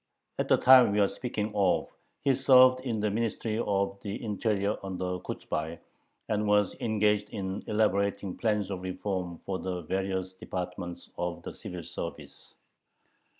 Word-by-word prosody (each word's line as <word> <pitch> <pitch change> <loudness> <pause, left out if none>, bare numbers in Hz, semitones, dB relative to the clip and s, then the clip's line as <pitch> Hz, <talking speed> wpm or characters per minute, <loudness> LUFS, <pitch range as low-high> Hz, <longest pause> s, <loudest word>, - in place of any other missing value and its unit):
At - - 0
the - - +5
time 125 -5 +7
we 105 - +2
are 100 - +5
speaking 110 -3 -3
of 95 -3 +2 0.4
he 140 -1 +4
served 130 -1 +6
in 120 -4 -2
the 105 -1 +1
Ministry 110 0 -1
of 100 -3 0
the 100 -2 -4
Interior 105 -1 0
under 90 -1 -3
Kochubay, 80 -1 -4 0.5
and 105 0 0
was 105 -1 +3
engaged 105 -2 +1
in 95 -2 -4
elaborating 100 -2 +1
plans 105 -3 0
of 95 -2 -4
reform 90 -1 -3
for 95 -1 -2
the 90 -1 -3
various 95 +1 -2
departments 90 -1 -6
of 85 0 -3
the - - -6
civil 90 -2 -7
service. - - -8
100 Hz, 150 wpm, -29 LUFS, 95-110 Hz, 0.5 s, time